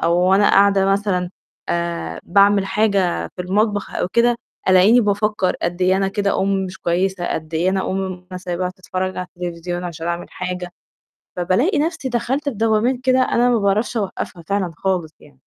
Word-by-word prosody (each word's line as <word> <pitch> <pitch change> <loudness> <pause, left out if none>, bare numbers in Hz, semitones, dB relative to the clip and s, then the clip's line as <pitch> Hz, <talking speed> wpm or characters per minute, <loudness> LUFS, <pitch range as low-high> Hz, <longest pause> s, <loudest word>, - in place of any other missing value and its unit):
أو 170 +1 +2
وأنا 200 +2 +5
قاعدة 200 -1 +4
مثلًا، 195 -3 0 0.4
آآ، 170 0 -2
باعمل 200 +1 +4
حاجة 195 -3 +1
في 180 - -3
المطبخ 205 +2 0
أو - - -1
كده، 235 0 +3 0.3
ألاقيني 190 +6 +6
بافكّر 210 -2 0
قد 175 +1 -2
إيه 185 +1 +4
أنا 195 0 +1
كده 200 -1 0
أُمّ 195 - +1 0.2
مش 185 - -9
كويسة، 180 +1 -1
قد 160 0 -6
إيه 175 +4 +2
أنا 190 -1 -1
أُمّ 185 -1 -4
أنا 180 - -4
سايباها 180 0 -3
تتفرّج 185 0 -4
على 185 - -4
التليفزيون 175 0 -4
علشان 165 -1 -6
أعمل 170 0 -3
حاجة، 180 -1 -5 0.7
فبالاقي 190 - +1
نَفْسي 320 -3 -1
دَخَلت 255 +3 -1
في 260 - -3
دوّامات 225 +4 +2
كده 260 0 +3
أنا 245 -1 +2
ما 240 - +3
باعرفش 210 +4 0
أوقفها 185 -4 -4
فعلًا 195 -3 -1
خالص 175 -4 -1
يعني. 145 - -19
190 Hz, 175 wpm, -20 LUFS, 180-210 Hz, 0.7 s, ألاقيني